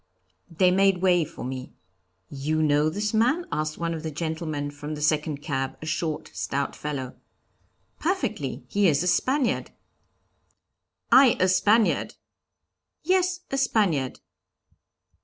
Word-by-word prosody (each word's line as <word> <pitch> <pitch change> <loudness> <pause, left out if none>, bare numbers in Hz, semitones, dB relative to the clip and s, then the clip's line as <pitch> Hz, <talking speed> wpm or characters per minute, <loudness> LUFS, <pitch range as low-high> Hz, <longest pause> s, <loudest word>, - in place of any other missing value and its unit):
They 180 +2 +3
made 190 -1 +3
way 175 -2 +4
for 145 - -8
me. 130 0 -6 0.5
'You 155 +3 -1
know 150 0 +3
this 205 +6 -2
man?' 255 +11 +2
asked 155 0 -2
one 170 0 -2
of 160 - -5
the 160 - -4
gentlemen 155 -2 -3
from 145 +1 -6
the - - -7
second 150 -1 0
cab, 135 -4 -3
a - - -8
short, 155 0 -3
stout 140 0 -2
fellow. 135 -4 -5 0.8
'Perfectly; 225 - -2
he 200 +7 +2
is 150 -1 +2
a - - -1
Spaniard.' 260 +7 +1 1.4
'I 260 -3 +7
a 185 - +4
Spaniard!' 210 +4 +2 0.9
'Yes, 365 +1 +1
a 270 - 0
Spaniard.' 170 - +1
160 Hz, 130 wpm, -25 LUFS, 145-210 Hz, 1.4 s, I